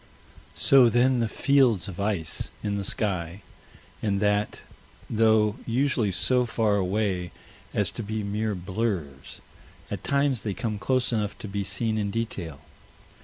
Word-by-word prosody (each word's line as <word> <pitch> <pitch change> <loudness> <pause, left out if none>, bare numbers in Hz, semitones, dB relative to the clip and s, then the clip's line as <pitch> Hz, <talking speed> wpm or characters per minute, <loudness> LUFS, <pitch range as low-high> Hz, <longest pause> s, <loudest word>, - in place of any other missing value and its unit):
So 130 -3 +6
then 125 +2 +3
the 115 - +1
fields 125 -11 +3
of 95 -2 -8
ice 100 -6 -2
in 105 -1 -1
the 100 - -2
sky, 95 -3 -2 0.6
and 100 -2 0
that, 105 0 0 0.5
though 110 -1 +3
usually 125 -3 +1
so 125 +6 +2
far 110 -3 +1
away 95 -2 -1 0.4
as - - 0
to - - -5
be 110 0 -3
mere 105 +1 -1
blurs, 90 -7 -4 0.5
at - - -4
times 140 -4 +1
they 100 -2 -3
come 110 0 -3
close 130 0 +1
enough 105 -2 -1
to - - -7
be 100 0 -2
seen 110 +3 -1
in 100 -1 -1
detail. 95 -9 -4
105 Hz, 145 wpm, -26 LUFS, 100-115 Hz, 0.6 s, So